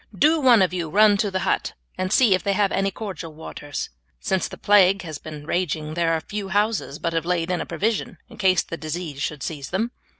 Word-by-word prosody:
Do 315 - +4
one 240 -7 +6
of 185 - 0
you 170 -3 -2
run 210 +3 +5
to 205 +1 0
the 190 -1 -2
hut - - 0 0.2
and 185 0 -2
see 230 -3 +5
if 185 - +1
they 200 - 0
have 200 -1 +2
any 195 0 +1
cordial 190 -5 -7
waters; 145 -2 -6 0.3
since 190 - 0
the - - -10
plague 195 -2 +4
has 155 -4 -6
been 150 -2 -9
raging 155 -3 -2
there 165 0 +1
are 160 - 0
few 205 +1 -5
houses 205 -6 0
but 170 -1 -2
have 165 -1 0
laid 175 0 -1
in 180 - 0
a - - -5
provision 220 +1 -2
in - - -14
case 185 -3 +3
the 165 - -6
disease 155 -3 -5
should 145 -1 -3
seize 145 -4 -5
them." 220 +6 -1
185 Hz, 230 wpm, -23 LUFS, 160-205 Hz, 0.3 s, one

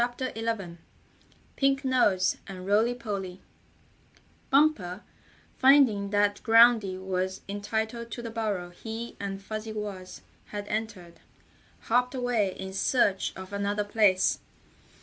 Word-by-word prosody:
STORY 255 0 -4
XI 220 -6 -3 0.8
PINK 275 0 +2
NOSE 210 -8 +2
AND 185 -1 -8
ROLLY 220 +5 +2
POLLY 200 -6 -5 1.1
Bumper, 265 -10 +2 0.6
finding 260 -8 +5
that 205 0 +1
Groundy 225 -4 +5
was 190 0 -3
entitled 220 +3 -3
to 235 +2 -6
the 230 - -5
burrow 205 -6 -3
he 225 +5 -7
and 195 -1 -4
Fuzzy 215 +1 -5
Wuzz 200 -4 -6 0.2
had 205 -1 -6
entered, 210 -6 -5 0.6
hopped 250 +3 +1
away 240 -6 0
in 190 0 -6
search 195 -2 +1
of 190 +1 -9
another 200 +1 -1
place. 205 -3 +3
210 Hz, 115 wpm, -28 LUFS, 190-235 Hz, 1.1 s, finding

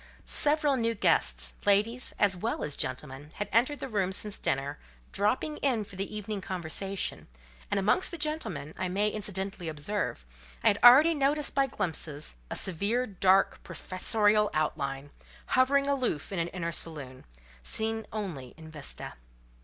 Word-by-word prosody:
Several 295 -2 +7
new 230 -1 0
guests, 60 - +1
ladies 215 +5 +2
as 200 -2 +2
well 220 +6 -3
as 150 - -1
gentlemen, 135 +2 -4
had 205 - -3
entered 260 +6 +2
the - - -5
room 200 -6 -1
since 205 +1 -2
dinner, 140 +2 -2 0.3
dropping 255 +9 -1
in 250 -6 0
for 200 - -13
the 195 +1 -4
evening 210 -1 -4
conversation; 185 +2 -4 0.4
and 200 - 0
amongst 215 - +1
the 340 - -6
gentlemen, 185 - -4
I 185 - -1
may 200 +4 +1
incidentally 195 -4 -4
observe, 155 - -3 0.4
I - - +6
had 200 - 0
already 275 +7 +8
noticed 290 0 0
by 275 -1 +2
glimpses, 155 - -4 0.2
a - - -4
severe, 200 +8 +2
dark, 195 -2 +2
professorial 210 +2 +1
outline, 140 -2 -2 0.4
hovering 275 +2 +3
aloof 260 - -1
in 190 - -3
an 165 - 0
inner 175 -2 -4
saloon, 145 -6 -5 0.4
seen 220 - -1
only 175 - -6
in 160 -1 -12
vista. 150 -3 -5
200 Hz, 150 wpm, -29 LUFS, 160-230 Hz, 0.4 s, already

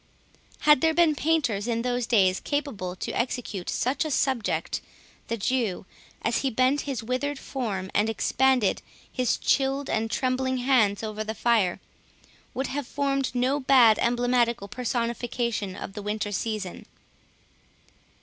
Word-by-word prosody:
Had 300 -3 +5
there 320 0 +3
been 335 -2 +4
painters 285 -10 0
in 230 -1 -1
those 245 -1 -1
days 190 -5 +3
capable 250 -12 -3
to - - -4
execute 235 -6 -3
such 255 +6 0
a 310 - -3
subject, 265 -5 0 0.5
the 230 - -2
Jew, 225 -4 -1 0.4
as 230 - +1
he 270 - 0
bent 255 +4 +2
his 255 -5 -3
withered 255 +5 -2
form, 205 -10 -4
and 210 +2 +2
expanded 250 0 +2 0.3
his 255 -3 0
chilled 275 0 +1
and 220 +1 0
trembling 260 +1 0
hands 240 -6 +2
over 215 0 -3
the 220 +1 -5
fire, 220 -6 +2 0.8
would 265 - -1
have 275 0 -4
formed 275 -3 -1
no 255 +4 +1
bad 255 -5 +5
emblematical 240 -2 +1
personification 235 -2 -2
of - - -7
the 205 - -6
Winter 210 0 -3
season. 205 -3 -4
245 Hz, 140 wpm, -26 LUFS, 215-265 Hz, 0.8 s, Had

